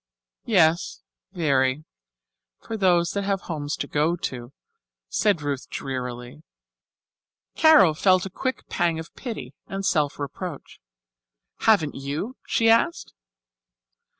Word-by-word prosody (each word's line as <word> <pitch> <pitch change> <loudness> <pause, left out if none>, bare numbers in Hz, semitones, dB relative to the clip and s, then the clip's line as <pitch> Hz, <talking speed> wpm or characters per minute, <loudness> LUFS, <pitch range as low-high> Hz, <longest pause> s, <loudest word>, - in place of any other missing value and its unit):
"Yes, 170 - +2 0.3
very 140 -3 +1 0.7
for 225 - -6
those 175 -5 +3
that 200 - -2
have 195 -1 -1
homes 150 -3 -4
to - - -3
go 155 +3 +1
to," 125 -7 -5 0.6
said 165 - +1
Ruth 140 -2 -3
drearily. 125 +1 -5 1.1
Carol 310 - +6
felt 185 +3 +3
a 195 - -6
quick 260 +7 -3
pang 170 -2 0
of 160 0 -8
pity 240 -4 -7
and 195 0 -4
self 150 -6 +1
reproach. 145 +3 -7 0.8
"Haven't 185 -10 +3
you?" 145 - -4
she 225 - +2
asked. 230 - +2
165 Hz, 115 wpm, -24 LUFS, 145-195 Hz, 1.1 s, Carol